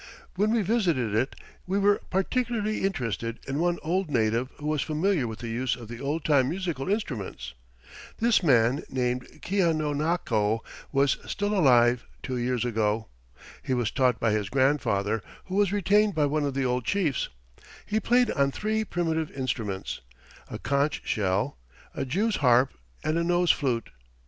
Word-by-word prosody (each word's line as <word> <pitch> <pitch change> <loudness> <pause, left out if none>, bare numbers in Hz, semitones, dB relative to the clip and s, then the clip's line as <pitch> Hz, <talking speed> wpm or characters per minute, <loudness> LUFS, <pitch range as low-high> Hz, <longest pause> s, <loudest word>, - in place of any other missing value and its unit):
When 205 +4 +1
we 230 -2 +2
visited 170 - +1
it, 115 +5 0 0.3
we 190 +2 0
were 200 0 +3
particularly 215 +2 0
interested 115 - -2
in 135 +2 -2
one 175 +1 +1
old 180 +2 0
native 115 -1 +1
who 150 - -9
was 150 -2 0
familiar 155 -2 +1
with 110 -1 -6
the 120 - -6
use 115 0 -1
of 115 -3 -11
the 120 0 -7
old 145 +3 -2
time 135 -4 +4
musical 170 -5 -3
instruments. 110 - -3 0.6
This 230 -2 +3
man, 130 -3 +3
named 125 -1 -1 0.2
Keanonako, 155 - +1 0.3
was 140 -1 +3
still 205 +1 -1
alive 125 - +4 0.2
two 130 -1 -3
years 125 0 0
ago. 110 -2 0 0.5
He 130 - -1
was 120 -3 0
taught 125 -4 +2
by 115 - +2
his 105 -2 -1
grandfather, 115 -6 +1 0.2
who 185 - -8
was 200 -2 +3
retained 205 0 +3
by 150 -2 +3
one 145 +1 0
of 140 -2 -2
the 135 -1 0
old 125 0 0
chiefs. 160 - 0 0.6
He 215 - 0
played 245 +1 +3
on 140 -2 +2
three 215 +8 -1
primitive 160 -5 -1
instruments 115 -8 -3 0.5
a - - -5
conch 140 +4 0
shell, 95 - 0 0.3
a - - -3
jew's 205 - 0
harp 125 -1 +4 0.3
and 155 +2 +1
a - - +1
nose 175 0 +3
flute. 125 -6 -1
140 Hz, 160 wpm, -27 LUFS, 120-180 Hz, 0.6 s, time